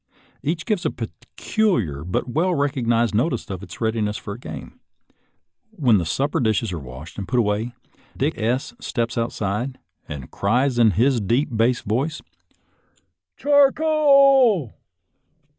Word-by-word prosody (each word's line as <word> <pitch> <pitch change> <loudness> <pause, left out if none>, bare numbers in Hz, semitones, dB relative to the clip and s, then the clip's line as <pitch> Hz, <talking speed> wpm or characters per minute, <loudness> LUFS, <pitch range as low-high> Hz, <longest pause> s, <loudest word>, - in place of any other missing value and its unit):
Each 155 +3 -2
gives 210 -6 0
a - - +1
peculiar 115 - -2
but 90 +8 -2
well 170 +8 +1
recognized 120 -5 +1
notice 120 +1 0
of 95 -2 -5
its 100 - -10
readiness 110 -2 -1
for 100 - -7
a 115 - -10
game. - - -9 0.9
When 130 - +3
the 85 - -3
supper 140 - 0
dishes 110 -3 0
are 85 - -3
washed 70 +7 -10
and 100 - -5
put 125 - -1
away 110 +1 0 0.4
Dick - - +1
S 120 +5 -1
steps 120 -1 -2
outside, 115 +2 -2 0.3
and 70 -3 -7
cries 120 +5 +1
in 115 -2 +6
his 125 0 +3
deep 120 +5 0
bass 120 +2 +2
voice, 135 +9 -1 0.6
" 90 -1 -43
Char 285 -1 +5
c 315 - -4
o - - +2
a 275 - +5
l - - -25
120 Hz, 155 wpm, -22 LUFS, 105-150 Hz, 0.9 s, in